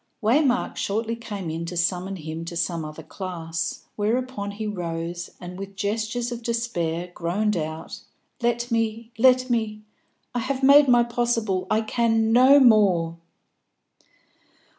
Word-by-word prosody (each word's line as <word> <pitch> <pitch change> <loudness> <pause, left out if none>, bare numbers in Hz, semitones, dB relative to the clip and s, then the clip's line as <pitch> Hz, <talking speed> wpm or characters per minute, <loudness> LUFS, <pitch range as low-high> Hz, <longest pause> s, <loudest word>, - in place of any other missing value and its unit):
Waymark 250 +2 +2
shortly 225 +3 -1
came 205 -7 -6
in 165 +1 -4
to 175 +1 -5
summon 180 +2 0
him 160 -1 -6
to 170 0 -5
some 170 -1 -1
other 155 +1 -8
class, 165 -3 -5
whereupon 225 0 -1
he 210 +2 -5
rose, 175 -3 -4
and, 180 +1 -8
with 195 0 -7
gestures 220 +4 -2
of 240 0 -5
despair, 180 -8 -2
groaned 200 +6 0
out 160 -1 -5 0.4
"Let 240 +1 0
me, 225 0 -1
let 255 0 +4
me! 215 -2 -1 0.5
I 245 - 0
have 265 +2 -3
made 280 +1 +7
my 240 -1 +5
possible; 235 -6 -1
I 220 - +2
can 225 0 +1
no 260 +4 +7
more!" 195 -9 +4
215 Hz, 140 wpm, -24 LUFS, 175-235 Hz, 0.5 s, made